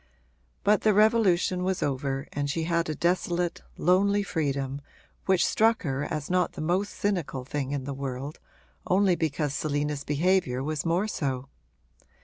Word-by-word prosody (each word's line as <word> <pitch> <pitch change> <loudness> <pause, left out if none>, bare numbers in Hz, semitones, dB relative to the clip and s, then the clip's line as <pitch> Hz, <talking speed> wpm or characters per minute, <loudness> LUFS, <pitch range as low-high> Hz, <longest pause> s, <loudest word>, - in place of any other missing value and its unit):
But 210 +1 +4
the 215 -2 +3
revolution 200 -4 +3
was 185 0 0
over 135 0 -2
and 145 0 -2
she 165 +3 -1
had 170 0 0
a 155 - -2
desolate, 175 +1 0 0.2
lonely 200 +4 +3
freedom 140 -6 -2 0.5
which 190 -2 +4
struck 225 +2 +3
her 140 -2 -1
as 145 -1 -3
not 180 -1 +1
the - - -9
most 180 +6 0
cynical 175 -10 -2
thing 140 -1 -3
in 140 -2 -2
the 140 +1 -4
world 135 +2 -5 0.5
only 190 -1 +4
because 150 -3 -1
Selina's 145 -1 -1
behaviour 150 -4 +1
was 155 +2 -2
more 175 +5 +1
so. 135 -8 -3
160 Hz, 150 wpm, -27 LUFS, 140-185 Hz, 0.5 s, But